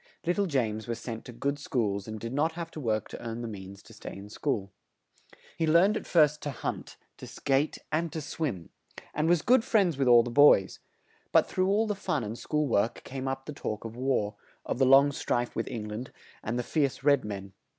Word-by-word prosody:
Lit 175 +1 +1
tle 200 -1 +1
James 110 -8 -1
was 115 -1 -2
sent 115 -1 -7
to - - -8
good 140 +4 -2
schools 105 -8 -1
and 110 0 -6
did 115 +3 -5
not 155 +4 +1
have 170 0 -6
to - - -8
work 110 -6 -1
to - - -8
earn 115 0 -5
the - - -3
means 100 -2 -9
to - - -15
stay - - -9
in 100 +1 -10
school. 105 -5 -2 0.8
He 165 -1 0
learned 175 +7 +5
at - - -4
first 150 -3 +4
to 145 - -3
hunt, 135 - -5 0.2
to - - -9
skate 140 +2 0
and 160 +1 0
to 160 - -4
swim; 140 - -4 0.4
and 155 +2 +1
was 175 -2 +3
good 250 0 +5
friends 195 - +2
with 135 - +2
all 120 -1 +7
the 120 - -5
boys; 140 -8 +5 0.5
but - - +5
through 185 0 0
all 205 +3 +3
the 210 - -1
fun 150 - -2
and 105 +1 -4
school 150 +4 -1
work 115 -1 0
came 135 0 -5
up 135 0 -3
the 150 - -6
talk 110 -5 -5
of 115 0 -7
war; 125 -5 0 0.3
of - - -3
the 135 - +4
long 135 +2 +7
strife 120 -3 -2
with 115 - -2
Eng 110 -4 -5
land 110 +5 -6 0.3
and 115 +3 -3
the 125 - -1
fierce 140 -1 -1
red 140 -2 +4
men. 100 -2 -6
135 Hz, 225 wpm, -29 LUFS, 110-155 Hz, 0.8 s, all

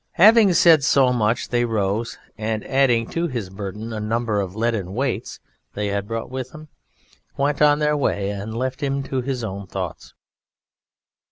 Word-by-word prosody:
Having 210 +1 +6
said 165 -4 +6
so 130 -2 +4
much 110 -1 0
they 120 -1 +1
rose, 110 -1 -1 0.2
and 110 0 -3
adding 125 -4 +2
to 170 +1 -1
his 115 - -5
burden 105 +3 -6
a 110 - -4
number 110 -1 -1
of 95 -1 -6
leaden 110 -5 -1
weights 135 0 -2 0.4
they 105 0 -2
had 100 0 -2
brought 115 +2 -4
with 130 -1 -4
them, 155 +1 -12 0.7
went 140 +1 0
on 145 -1 +5
their 150 0 +1
way 100 -8 0
and 105 +3 -5
left 130 +3 -3
him 140 -1 -1
to 135 -1 -2
his 125 -1 -3
own 100 -2 -5
thoughts. 90 -3 -6
115 Hz, 170 wpm, -22 LUFS, 105-140 Hz, 0.7 s, Having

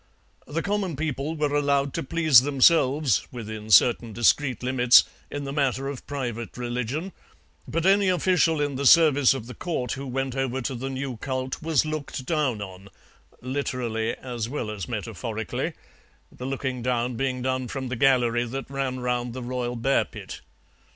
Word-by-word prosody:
The 165 +3 -3
common 200 -5 -1
people 150 +1 -3
were 150 -2 -1
allowed 140 -1 +1
to - - -2
please 155 -3 +5
themselves, 140 - +3
within 110 -3 -7
certain 115 +3 +5
discreet 125 +2 +2
limits, 125 -1 +6 0.3
in 145 - -5
the 135 0 -5
matter 135 -2 0
of 140 -2 -7
private 120 -5 -4
religion, 125 - -3 0.6
but 165 +1 -2
any 195 0 +4
official 180 -3 +2
in 145 -2 -1
the 140 0 +2
service 145 -5 +6
of 115 - -6
the 125 - -8
Court 145 -9 -3
who 135 +1 -4
went 135 0 -2
over 135 -1 -1
to 130 +1 -3
the 130 +2 -4
new 130 -2 -4
cult 130 +1 -4
was 160 -3 +2
looked 155 -4 -4
down 135 -9 0
on, 95 0 -11 0.5
literally 125 -4 -2
as 120 -3 -5
well 120 -6 -3
as 100 -6 -6
metaphorically, - - -4 0.6
the 125 - -7
looking 130 -2 -3
down 125 0 -1
being 130 0 -2
done 130 -1 -1
from 130 0 -5
the 125 - -2
gallery 120 -2 +3
that 135 +3 -6
ran 135 -2 -2
round 125 -1 -1
the 130 0 -6
royal 125 0 -3
bear 135 +4 +2
pit. - - -9
130 Hz, 165 wpm, -25 LUFS, 120-145 Hz, 0.6 s, limits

